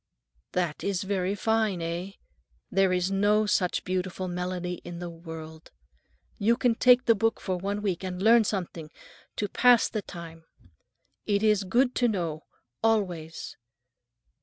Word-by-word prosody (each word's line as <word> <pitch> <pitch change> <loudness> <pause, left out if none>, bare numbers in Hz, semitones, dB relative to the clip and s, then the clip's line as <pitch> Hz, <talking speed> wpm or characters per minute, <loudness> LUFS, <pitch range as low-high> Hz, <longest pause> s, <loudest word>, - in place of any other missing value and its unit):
"That 175 -4 -1
is 200 -2 -1
very 190 0 -1
fine, 220 -3 +1
eh? 170 +3 -4 0.6
There 195 -1 +3
is 180 +1 0
no 205 +2 +3
such 185 -3 +1
beautiful 185 0 -3
melody 180 0 -4
in 175 -1 -7
the 175 0 -6
world. 160 -1 -10 0.7
You 230 +3 +3
can 245 -2 +2
take 250 +2 +5
the 230 - +6
book 225 +1 0
for 185 - -2
one 200 +3 -3
week 190 -3 -1
and 180 -1 -4
learn 225 +3 +6
something, 175 -6 -4 0.5
to 205 - -1
pass 245 +2 +5
the 215 - -3
time. 165 -3 -10 0.8
It 205 0 +1
is 210 -2 +3
good 245 +6 +2
to 245 - +3
know—always. 170 - -3
190 Hz, 140 wpm, -27 LUFS, 175-210 Hz, 0.8 s, the